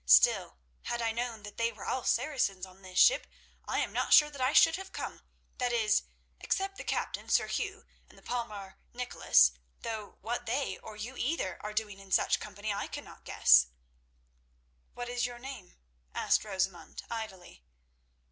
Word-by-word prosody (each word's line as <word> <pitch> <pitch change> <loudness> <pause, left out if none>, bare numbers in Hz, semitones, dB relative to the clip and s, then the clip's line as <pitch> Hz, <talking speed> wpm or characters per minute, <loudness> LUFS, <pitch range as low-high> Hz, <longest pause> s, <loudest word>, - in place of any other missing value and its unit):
Still, 60 +1 +5 0.3
had 240 - -2
I 230 -1 +1
known 230 -2 -4
that 205 0 -10
they 230 0 +1
were - - -10
all 255 - -1
Saracens 230 -8 0
on 185 +1 -17
this 185 -1 -9
ship, - - +6 0.4
I - - +1
am - - -3
not - - -1
sure 300 -1 +8
that 280 -3 -8
I 255 +1 +3
should 325 +1 +6
have 385 0 -9
come—that 250 -1 -6
is, 215 -3 +2 0.3
except 390 0 -1
the - - -5
captain, - - -3
Sir - - +4
Hugh, 410 +2 -3 0.2
and - - -19
the - - -18
palmer 215 -6 -5
Nicholas; 240 - +4 0.3
though 220 -3 -5
what 240 +2 -3
they, 265 +5 -1
or 215 - -10
you 230 +5 -6
either, 250 - -1
are 210 - -5
doing 210 -2 -3
in 195 -1 -14
such - - +3
company 205 0 -4
I 200 - -3
cannot - - -9
guess." 60 -1 +6 1.3
"What 245 0 -5
is 245 0 0
your 245 -1 -8
name?" 240 -6 -9 0.4
asked - - +2
Rosamund 190 -3 -3
idly. 190 - -7
225 Hz, 170 wpm, -31 LUFS, 195-250 Hz, 1.3 s, sure